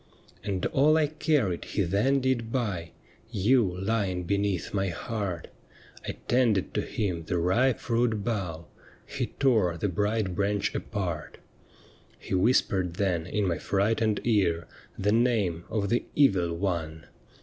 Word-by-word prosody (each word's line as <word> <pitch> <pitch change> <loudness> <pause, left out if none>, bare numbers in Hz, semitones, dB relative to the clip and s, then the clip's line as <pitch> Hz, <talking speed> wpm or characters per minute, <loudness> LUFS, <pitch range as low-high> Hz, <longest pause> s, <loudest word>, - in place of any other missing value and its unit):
' - - -28
And 95 -3 -2
all 150 +3 +4
I 155 - +4
carried 145 - 0
he 100 - -1
then 105 +10 +2
did 125 -3 0
buy 100 -10 -2 0.2
— 110 - -31 0.2
You 130 0 +6 0.2
lying 95 -3 -1
beneath 100 0 -1
my 95 -1 +1
heart 95 -1 -4 0.3
— - - -22
I - - -2
tended 120 -6 +2
to - - 0
him 90 -6 -3
the 90 +2 -1
ripe 115 +10 +2
fruit 115 -3 0
bough. 90 -8 -3 0.4
He - - -3
tore 110 -11 +2
the 100 - -1
bright 105 +1 0
branch 100 +2 0
apart. 90 -7 -4 0.8
'He - - -7
wiiispered 95 -3 +2
then 90 -4 0
in 105 +2 0
my 85 - -1
frightened 105 +2 +1
ear 95 -8 +2 0.3
The 100 +1 +1
name 110 -8 +1
of 105 -3 -1
the 120 - +1
Evil 95 -12 +3
One. 85 -3 -3
100 Hz, 150 wpm, -28 LUFS, 90-115 Hz, 0.8 s, You